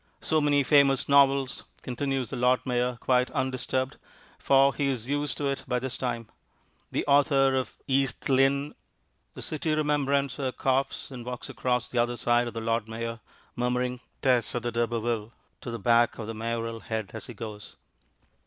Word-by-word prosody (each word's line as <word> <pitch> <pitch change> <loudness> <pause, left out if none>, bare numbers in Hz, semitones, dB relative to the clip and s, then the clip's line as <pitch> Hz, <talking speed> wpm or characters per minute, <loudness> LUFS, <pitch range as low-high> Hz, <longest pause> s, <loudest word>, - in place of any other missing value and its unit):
"So 155 -1 +1
many 145 -1 +3
famous 140 -1 +4
novels," 140 -2 +3 0.2
continues 130 -1 -2
the - - -3
Lord 125 +1 +2
Mayor 125 -1 0
quite 125 -1 +2
undisturbed, 130 0 -2 0.4
for 135 0 +4
he 145 - 0
is 125 -4 -2
used 145 +1 -1
to 145 - -2
it 140 -1 -1
by 125 -1 0
this 130 +1 -3
time. 120 -3 -3 0.6
"The - - -1
author 140 -1 +4
of 130 -1 -2
East 135 -1 0
Lynne 140 +2 +2 0.3
" - - -46
The - - -6
City 155 0 -1
Remembrancer 140 -3 0
coughs 135 +1 -1
and 125 -2 -7
walks 125 0 -6
across 125 -1 -1
to - - -15
the 120 - +2
other 120 0 -1
side 120 0 +2
of 120 - -7
the 115 - -3
Lord 115 0 0
Mayor, 115 +1 -5 0.4
murmuring 125 +1 -1 0.2
Tess 125 -4 +2
of 120 - -2
the 120 - -1
D'Urbervilles 115 -1 -1 0.3
to - - -6
the 115 - -4
back 115 +2 +3
of 110 - -5
the 115 - -5
Mayoral 115 +1 -3
head 110 -3 -4
as 110 - -7
he 120 - -9
goes. 105 -1 -8
125 Hz, 180 wpm, -27 LUFS, 120-135 Hz, 0.6 s, famous